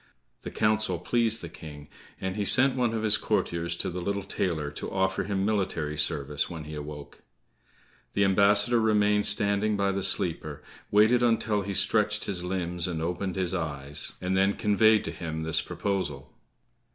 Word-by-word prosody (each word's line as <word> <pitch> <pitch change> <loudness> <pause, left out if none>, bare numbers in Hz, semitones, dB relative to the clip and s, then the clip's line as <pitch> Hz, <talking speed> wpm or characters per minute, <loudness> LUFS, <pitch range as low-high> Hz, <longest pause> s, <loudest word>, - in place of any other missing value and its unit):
The - - -6
counsel 110 -4 +1
pleased 115 +4 +2
the - - -4
King, 75 -3 -11 0.3
and 95 0 -3
he 105 - -1
sent 130 +5 +4
one 125 -3 +1
of 110 - -2
his 105 -1 +5
courtiers 85 0 -1
to - - -2
the 90 +1 -5
little 100 +2 -2
tailor 80 -6 -2
to - - -6
offer 95 0 0
him 100 -1 -1
military 95 -8 -1
service 75 -1 -1
when 80 -3 -7
he 75 +1 -9
awoke. 75 -1 -8 0.9
The 100 - +2
ambassador 100 +4 +4
remained 105 -1 +3
standing 100 +1 +2
by 100 -1 +1
the 100 0 -2
sleeper, 75 -5 -2 0.3
waited 110 +4 +4
until 115 -3 +1
he 100 0 -4
stretched 105 +1 +1
his 95 -4 -3
limbs 90 -2 -2
and 85 -3 -3
opened 90 +3 -3
his 95 -2 -1
eyes, 75 -4 -3
and 90 +1 -1
then 95 +1 +3
conveyed 110 +1 +3
to - - -4
him 80 -2 -5
this 80 0 0
proposal. 85 -6 -4
95 Hz, 170 wpm, -27 LUFS, 80-105 Hz, 0.9 s, his